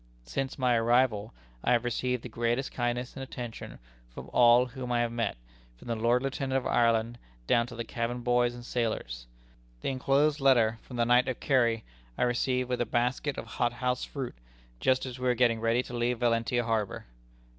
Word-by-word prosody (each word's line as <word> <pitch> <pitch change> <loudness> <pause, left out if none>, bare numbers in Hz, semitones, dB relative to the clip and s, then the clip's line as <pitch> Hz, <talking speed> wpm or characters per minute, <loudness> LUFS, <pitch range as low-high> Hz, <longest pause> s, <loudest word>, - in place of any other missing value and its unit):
"Since 130 - -3
my 125 -3 +2
arrival, 115 -2 +2 0.3
I 125 - +3
have 120 -1 +2
received 125 0 -1
the - - -5
greatest 120 +3 -1
kindness 120 0 -2
and 135 - -6
attention 120 -3 -7 0.3
from - - -10
all 120 +1 +6
whom 125 0 -6
I 120 -1 +2
have 120 -1 0
met, 115 - -2 0.4
from - - -14
the 115 - 0
Lord 120 +3 +2
Lieutenant 135 -1 -1
of 130 - -3
Ireland, 115 0 +2 0.3
down 115 - +2
to 120 - -9
the 115 - -3
cabin 120 +1 -3
boys 120 0 +2
and 120 0 -10
sailors. - - -3 0.5
The - - -1
inclosed 140 +3 +2
letter 115 -5 +4
from 125 - -9
the 120 - +2
Knight 125 +2 +4
of 130 - -3
Kerry, 120 -5 +2 0.3
I - - +1
received 125 +1 +1
with 125 -1 -1
a - - +1
basket 125 +4 0
of - - -5
hothouse 125 +2 -1
fruit, 135 -4 -5 0.5
just 130 - +2
as 125 -1 -7
we 125 - -1
were 125 - +3
getting 115 -2 +3
ready 115 +2 +1
to 125 - -10
leave 120 +1 0
Valentia 120 0 +1
harbor. 110 -3 -2
120 Hz, 190 wpm, -29 LUFS, 115-125 Hz, 0.5 s, all